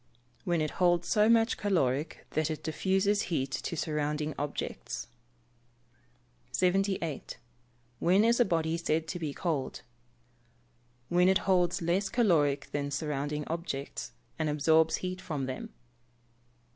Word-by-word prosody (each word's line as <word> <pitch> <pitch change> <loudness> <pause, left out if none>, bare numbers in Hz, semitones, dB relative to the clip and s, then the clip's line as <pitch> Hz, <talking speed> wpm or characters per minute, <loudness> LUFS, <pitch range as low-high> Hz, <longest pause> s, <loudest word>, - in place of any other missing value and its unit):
_ - - -38 0.4
When 170 -2 +1
it 155 - -1
holds 175 -1 +3
so 215 0 +4
much 230 0 +4
caloric 155 -8 0
that 155 0 0
it 155 - -4
diffuses 190 +5 +1
heat 135 -6 -1
to 170 - -3
surrounding 150 -1 -1
objects. 145 +1 -4 1.5
78. 185 -4 0 0.6
When 190 +5 +4
is 235 +1 +3
a - - +7
body 165 -2 0
said 160 -1 0
to 175 - -3
be 155 -3 -2
cold? 150 -3 -3 1.3
When 180 +1 +4
it 190 - +2
holds 180 -3 +2
less 180 +4 +1
caloric 150 - +2
than 145 -1 -2
surrounding 145 0 -2
objects, 140 -7 -4 0.3
and 155 -1 +1
absorbs 160 +2 +3
heat 185 0 -4
from 150 -7 -3
them. 130 0 -5
165 Hz, 130 wpm, -30 LUFS, 150-185 Hz, 1.5 s, a